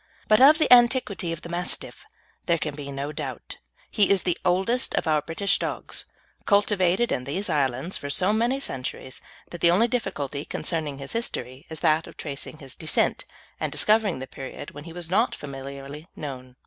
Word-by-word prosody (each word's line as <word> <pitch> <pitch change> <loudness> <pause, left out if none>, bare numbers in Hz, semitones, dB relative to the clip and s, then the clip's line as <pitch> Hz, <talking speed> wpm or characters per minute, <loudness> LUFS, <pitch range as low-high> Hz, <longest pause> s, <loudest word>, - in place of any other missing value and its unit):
But 215 +2 +5
of 295 +4 +8
the 310 -5 +6
antiquity 240 -7 +4
of 165 - -6
the 170 - -8
Mastiff 175 +1 -2 0.4
there 170 -1 +3
can 150 -2 -3
be 140 -1 -7
no 140 +2 -4
doubt. 140 -5 -6 0.3
He 205 -2 +3
is 195 -3 +4
the 180 -2 +1
oldest 190 +8 +2
of - - 0
our 155 -2 +2
British 165 +6 +1
dogs, - - -3 0.4
cultivated 200 +1 +3
in 125 - -1
these 180 +8 -2
islands 140 +3 +1
for 145 - -6
so 185 +8 +3
many 240 +5 +1
centuries 130 - -2 0.3
that 175 - -8
the 170 - +6
only 195 +7 +4
difficulty 150 - -3
concerning 155 -4 -3
his 135 0 -6
history 140 - -3
is 160 -1 -7
that 155 +1 +2
of - - -13
tracing 145 +1 -5
his 135 -4 -8
descent, 160 - +2 0.3
and - - -2
discovering 215 -6 +3
the 130 - -6
period 135 +1 -8
when 145 +1 -10
he 165 - -9
was 175 -1 -5
not 225 +6 +2
familiarly 140 +2 -8
known. 130 -3 -7
165 Hz, 185 wpm, -25 LUFS, 140-200 Hz, 0.4 s, of